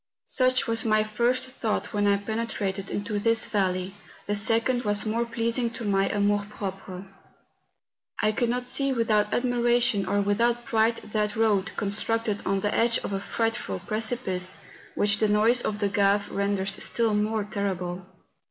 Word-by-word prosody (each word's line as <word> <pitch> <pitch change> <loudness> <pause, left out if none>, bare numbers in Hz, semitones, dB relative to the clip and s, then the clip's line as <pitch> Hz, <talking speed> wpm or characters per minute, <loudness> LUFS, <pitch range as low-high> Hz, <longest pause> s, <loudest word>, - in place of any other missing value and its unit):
Such 255 -1 +3
was 230 0 +2
my 215 -1 +3
first 240 +4 0
thought 240 -4 -3
when 205 -1 +1
I 200 0 +4
penetrated 205 -2 -3
into 205 0 -3
this 230 +2 +2
valley; 185 -2 -1 0.3
the 205 - -1
second 230 +4 +2
was 205 -2 0
more 230 +2 0
pleasing 230 +1 0
to - - -6
my 195 -1 +1
amour 205 0 +1
propre, 195 -2 -7 1.1
I 215 - +2
could 235 +2 0
not 250 +1 -1
see 275 +2 +1
without 215 -4 +1
admiration 240 -4 +2
or 205 - +1
without 230 +4 +1
pride 225 0 +2 0.2
that 210 -1 0
road, 215 -3 +1
constructed 215 +1 -1
on 195 0 +1
the 205 +1 -1
edge 230 0 +3
of - - -4
a 195 - -2
frightful 225 - -2
precipice, 215 - -1 0.4
which 205 0 +2
the 215 - +2
noise 220 +4 +4
of 210 - -2
the 205 -1 +1
Gave 200 0 +1
renders 200 -1 -1
still 230 -2 +1
more 210 +1 0
terrible. 190 -3 -3
215 Hz, 160 wpm, -26 LUFS, 200-230 Hz, 1.1 s, I